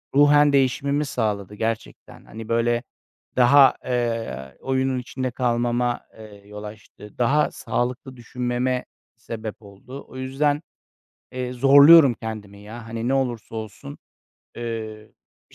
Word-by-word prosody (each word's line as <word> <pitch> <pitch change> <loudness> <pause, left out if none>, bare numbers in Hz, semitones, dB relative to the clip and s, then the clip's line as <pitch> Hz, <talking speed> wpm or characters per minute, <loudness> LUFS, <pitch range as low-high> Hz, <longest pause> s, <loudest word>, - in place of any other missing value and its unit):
ruhen 145 0 +5
değişimimi 140 +2 +1
sağladı 105 -6 -3
gerçekten. 115 +1 -5
Hani, 110 +1 -10
böyle, 120 +1 +1 0.5
daha, 135 +2 +6
eee, 115 - -3
oyunun 130 -1 0
içinde 130 +1 -4
kalmama, 120 0 0 0.2
eee, 105 -2 -13
yol 105 0 -9
açtı. 105 0 -12
Daha 135 +5 +2
sağlıklı 125 +2 -3
düşünmeme 125 +1 -2 0.3
sebep 110 -2 -7
oldu. 110 +7 -12
O 130 - -12
yüzden, 145 +3 0 0.7
eee, 125 -1 -4
zorluyorum 140 +2 +7
kendimi 105 -3 -8
ya. 110 +3 -10
Hani, 115 +1 -4
ne 135 - +1
olursa 120 -5 -2
olsun, 105 -9 -8 0.6
eee, 110 -2 -6 0.4
bir - - -20
120 Hz, 120 wpm, -23 LUFS, 110-130 Hz, 0.7 s, zorluyorum